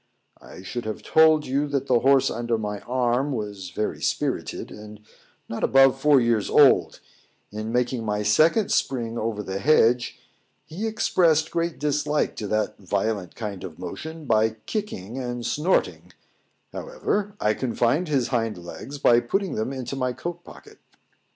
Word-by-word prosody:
I 90 - -12
should 120 +5 -5
have 110 - -5
told 160 -1 +4
you 140 +3 0
that 140 -2 -1
the 125 -3 +3
horse 135 +1 +4
under 120 -1 -1
my 105 -2 -4
arm 125 +3 0
was 105 -5 -5
very 105 - -3
spirited, - - -2
and 105 0 -11 0.5
not 115 - -5
above 135 0 +5
four 150 -2 +5
years 115 -4 +1
old; - - +4 0.5
in 110 +1 -5
making 125 0 0
my 105 -1 -1
second 155 - +3
spring 115 -3 -1
over 110 -2 -3
the 95 0 -4
hedge, 125 -2 +3 0.5
he 195 +8 -4
expressed 165 -7 +2
great 170 -1 -1
dislike 150 0 0
to 105 - -4
that 110 +1 -1
violent 100 -1 -2
kind 105 -5 -6
of 80 -3 -8
motion 155 - -7
by 110 -2 +2
kicking 135 - -4
and 120 -2 -4
snorting; 170 +6 0 0.6
however, 210 - -3
I 105 - +2
confined 125 +7 0
his 135 -6 0
hind 115 -5 -1
legs 105 +10 -8
by 120 -4 +5
putting 190 +11 -2
them 110 +4 -2
into 130 -1 -5
my 130 -2 -1
coat 175 +5 -6
pocket. - - -15
125 Hz, 155 wpm, -24 LUFS, 110-150 Hz, 0.6 s, above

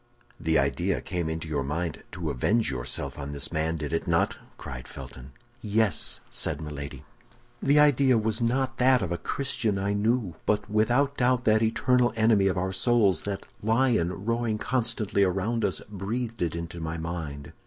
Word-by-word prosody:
"The 80 0 +2
idea 70 -1 +1
came 85 -3 -3
into 80 0 -4
your 75 -3 -1
mind 80 +4 -3
to 85 -4 -3
avenge 100 - +1
yourself 65 +2 -3
on 70 0 -5
this 70 -1 -2
man, 80 0 0
did 75 0 -4
it 80 - -1
not?" - - +2 0.2
cried - - -8
Felton. 65 0 -10 0.3
"Yes," 105 -4 +1
said - - -3
Milady. 75 -1 -7 0.6
"The 140 +2 +4
idea 140 -4 +5
was 110 +1 0
not 130 +2 0
that 130 -2 +5
of 90 - -3
a 85 - 0
Christian, 115 -7 -1
I 100 +1 0
knew; 110 -2 +1
but 105 -1 +1
without 120 +7 +2
doubt, 125 0 +2
that 110 0 +4
eternal 120 +2 +3
enemy 110 -3 +4
of 95 - 0
our 95 +1 -1
souls, 100 -3 +3
that 100 -1 -4 0.2
lion 110 -5 +1
roaring 115 -1 0
constantly 115 -4 +1
around 100 +5 0
us, 90 - -1
breathed 110 +4 -4
it 85 -2 0
into 85 0 -5
my 80 0 -3
mind. 80 -4 -5
100 Hz, 170 wpm, -27 LUFS, 80-115 Hz, 0.6 s, idea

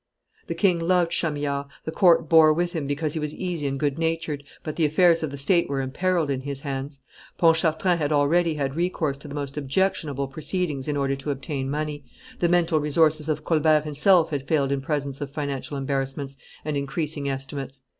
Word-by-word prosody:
The - - -3
king 180 -4 +2
loved 175 0 +2
Chamillard; 145 -3 -1 0.2
the 160 - -3
court 165 -2 +4
bore 160 -1 +7
with 175 +2 -1
him 155 -5 -3
because 150 +1 -2
he 160 - -2
was 150 0 -4
easy 175 -6 -3
and 135 0 -3
good 145 +1 -1
natured, 165 -3 -1 0.2
but 155 - -5
the 165 - 0
affairs 165 +2 +4
of 155 - -2
the 140 - -7
state 170 +5 +2
were 140 -1 -1
imperilled 160 +4 0
in 130 -1 -2
his 140 0 -5
hands; 140 0 -5 0.4
Pontchartrain 165 +1 +3
had 150 -1 0
already 155 +3 +3
had 140 -2 -2
recourse 160 -5 -1
to 150 - -10
the 145 - -7
most 140 -1 -5
objectionable 145 -2 0
proceedings 150 0 -3
in 145 -1 -1
order 135 -1 0
to 135 +2 -6
obtain 135 -1 -3
money; 150 0 -3 0.4
the 175 - +2
mental 170 -2 +3
resources 155 +1 +2
of 155 0 -2
Colbert 155 -2 +3
himself 160 +3 +3
had 140 -2 -3
failed 140 -4 +1
in 140 -1 0
presence 140 -2 -3
of 145 - -3
financial 140 0 -4
embarrassments 135 0 -3 0.3
and 150 -1 -2
increasing 140 +1 -2
estimates. 135 0 -5
150 Hz, 195 wpm, -25 LUFS, 140-165 Hz, 0.4 s, bore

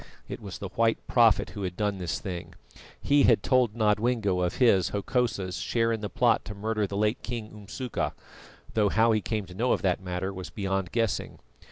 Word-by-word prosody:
It - - -6
was 100 -3 -7
the 100 -3 -6
white 115 +3 +2
prophet 115 -3 +3
who 100 - -7
had 90 -2 -4
done 105 -2 -1
this 90 -2 -2
thing; 90 -4 -6 0.4
he 145 0 +3
had 115 -6 +4
told 125 -5 +2
Nodwengo 105 -3 +1
of 90 -1 0
his, 100 -8 +4
Hokosa's, 100 -3 -1
share 115 -1 0
in 110 -2 -2
the 105 - -3
plot 115 +4 +2
to 105 - -7
murder 105 0 -1
the 100 - -4
late 105 +2 +1
King 115 -3 -5
Umsuka, 105 +4 -4 0.6
though 105 -2 +3
how 115 +3 +3
he 110 -1 +2
came 110 -3 -2
to 90 - -12
know 120 +7 +1
of - - -2
that 95 -1 +1
matter 90 +1 -3
was 95 -1 -7
beyond 95 -3 -2
guessing. 115 -6 -1
105 Hz, 200 wpm, -27 LUFS, 95-115 Hz, 0.6 s, had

